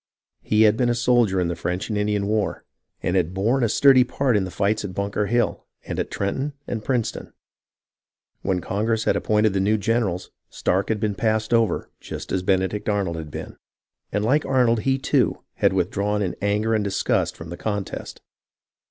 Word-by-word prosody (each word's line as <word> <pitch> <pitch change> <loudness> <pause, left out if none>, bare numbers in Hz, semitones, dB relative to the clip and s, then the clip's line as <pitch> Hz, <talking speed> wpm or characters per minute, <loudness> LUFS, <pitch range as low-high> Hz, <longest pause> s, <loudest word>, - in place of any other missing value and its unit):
He 110 +1 +3
had 110 0 +4
been 120 0 +2
a 120 - +2
soldier 115 -5 +3
in 90 - +1
the 85 - -2
French 90 +4 -3
and 110 - -1
Indian 105 -1 0
War, 105 0 -1 0.4
and 90 - 0
had 90 -1 +1
borne 115 +7 +1
a 115 - +2
sturdy 130 +2 +6
part 130 0 0
in 100 -2 +2
the - - -5
fights 105 +3 0
at 95 -3 -6
Bunker 100 +1 -1
Hill 120 +3 0 0.2
and - - -4
at - - -2
Trenton 135 +9 -2
and 110 -3 -4
Princeton. 125 -3 -2 1.1
When 95 -2 0
Con 100 +4 -2
gress 115 -1 +1
had - - +2
appointed 105 -1 +2
the 100 - +1
new 105 +3 +2
generals, 105 -5 -1 0.2
Stark 95 +2 0
had 110 -2 0
been 105 0 0
passed 110 +2 0
over 115 -2 +1
just - - -7
as 95 - 0
Benedict 95 +3 0
Arnold 100 -5 0
had 80 -2 -6
been, - - -8 0.5
and 105 +1 0
like 145 +6 +3
Arnold 125 -4 +2
he, 135 +4 +1
too, 135 - +1
had - - +3
withdrawn 100 +3 0
in 90 - -2
anger 105 +3 +1
and 110 -1 +1
disgust 100 -1 0
from 80 - -9
the 85 - -5
contest. 100 -1 -4
105 Hz, 195 wpm, -23 LUFS, 95-115 Hz, 1.1 s, sturdy